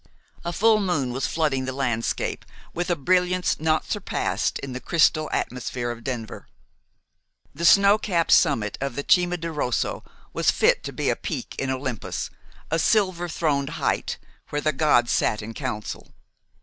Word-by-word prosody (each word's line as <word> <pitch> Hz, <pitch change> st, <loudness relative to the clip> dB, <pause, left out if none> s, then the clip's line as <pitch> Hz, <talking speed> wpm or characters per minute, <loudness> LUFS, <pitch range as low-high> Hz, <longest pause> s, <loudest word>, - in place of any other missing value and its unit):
A 170 Hz, -, -2 dB
full 220 Hz, +4 st, +4 dB
moon 160 Hz, -11 st, 0 dB
was 130 Hz, +2 st, -1 dB
flooding 145 Hz, -5 st, 0 dB
the 130 Hz, -, -2 dB
landscape 125 Hz, -4 st, -2 dB, 0.3 s
with 175 Hz, +2 st, -2 dB
a 175 Hz, -, +2 dB
brilliance 180 Hz, +3 st, +1 dB
not 155 Hz, 0 st, +1 dB
surpassed -, -, -1 dB
in 135 Hz, -2 st, -6 dB
the 125 Hz, -, -4 dB
crystal 155 Hz, 0 st, +2 dB
atmosphere 125 Hz, -1 st, -2 dB
of 120 Hz, -1 st, -9 dB
Denver. 115 Hz, -4 st, -5 dB, 1.1 s
The 165 Hz, +4 st, -3 dB
snow 200 Hz, +4 st, +6 dB
capped 175 Hz, -6 st, 0 dB
summit 105 Hz, -2 st, +3 dB
of 135 Hz, -3 st, -3 dB
the 140 Hz, -, -4 dB
Cima 180 Hz, -1 st, +4 dB
di 165 Hz, 0 st, -4 dB
Rosso 145 Hz, -6 st, -1 dB, 0.3 s
was -, -, +2 dB
fit -, -, +3 dB
to -, -, -4 dB
be -, -, 0 dB
a -, -, 0 dB
peak -, -, -5 dB
in 135 Hz, -, -1 dB
Olympus, 130 Hz, -4 st, -3 dB, 0.4 s
a 165 Hz, -, +2 dB
silver 185 Hz, -2 st, +2 dB
throned 145 Hz, -4 st, 0 dB
height -, -, -1 dB, 0.3 s
where 145 Hz, -, -1 dB
the 155 Hz, +1 st, 0 dB
gods 130 Hz, -5 st, +3 dB
sat 105 Hz, -1 st, +1 dB
in 115 Hz, +2 st, -7 dB
council. 120 Hz, -5 st, -5 dB
145 Hz, 160 wpm, -24 LUFS, 125-175 Hz, 1.1 s, snow